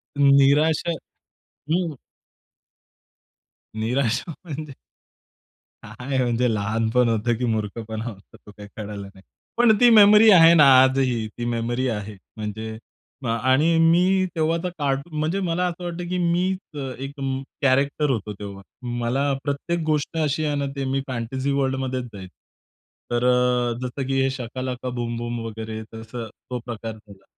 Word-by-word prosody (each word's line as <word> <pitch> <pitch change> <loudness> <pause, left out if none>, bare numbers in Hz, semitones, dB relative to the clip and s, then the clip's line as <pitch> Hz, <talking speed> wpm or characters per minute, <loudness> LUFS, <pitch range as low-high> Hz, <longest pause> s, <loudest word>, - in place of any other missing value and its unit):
निराशा 145 +4 +4 0.8
हं. 165 -5 0 1.8
निराशा 125 +6 -1
म्हणजे. 150 -2 -6 1.1
काय 125 +6 -5
म्हणजे 120 -1 +1
लहानपण 115 +3 +1
होतं 115 +1 +1
की 125 - -1
मूर्खपणा 110 0 -3
होता 105 -4 -10
तो 105 - -16
काही 105 0 -12
कळला 105 -1 -6
नाही. 95 -1 -16 0.4
पण 235 -3 +5
ती 245 -1 +7
मेमरी 215 0 +8
आहे 165 -2 +8
ना 155 -3 +7 0.2
आजही. 130 -4 +1
ती 120 +2 -7
मेमरी 120 +2 -1
आहे, 105 -1 -4 0.2
म्हणजे 110 +1 -5 0.5
अ, - - -3
आणि 130 +8 +2
मी 180 +3 +4
तेव्हा 160 +1 +1
तर 180 - -1
कार्टून 140 +3 -2
म्हणजे 165 +6 0
मला 180 0 0
असं 175 +1 -6
वाटतं 175 0 -5
कि 180 - -1
मी 175 +2 +1 0.2
अ, - - -6 0.2
एक 135 +2 -7
अ, - - -4 0.4
कॅरेक्टर 140 +2 +2
होतो 105 -3 -3
तेव्हा, 100 -1 -8 0.4
मला 135 +4 0
प्रत्येक 145 +4 -2
गोष्ट 155 +1 -1
अशी 150 +1 0
आहे 145 -1 0
ना 140 0 -1
ते 135 -1 -3
मी 135 +1 -1
फॅन्टसी 130 +3 -3
वर्ल्डमध्येच 130 -2 -1
जायचं. 95 -2 -10 0.8
तर 120 0 0
अ, 125 -1 +2
जसं 130 +1 -4
की 135 0 +1
हे 135 - +2
शका 130 -1 -6
लका 125 0 -4
बूम 120 -1 -3
बूम 120 0 -4
वगैरे 110 0 -6
तसं 115 +1 -7 0.2
तो 125 -1 -3
प्रकार 115 -2 -5
झाला 100 -3 -17
130 Hz, 150 wpm, -23 LUFS, 115-150 Hz, 1.8 s, मेमरी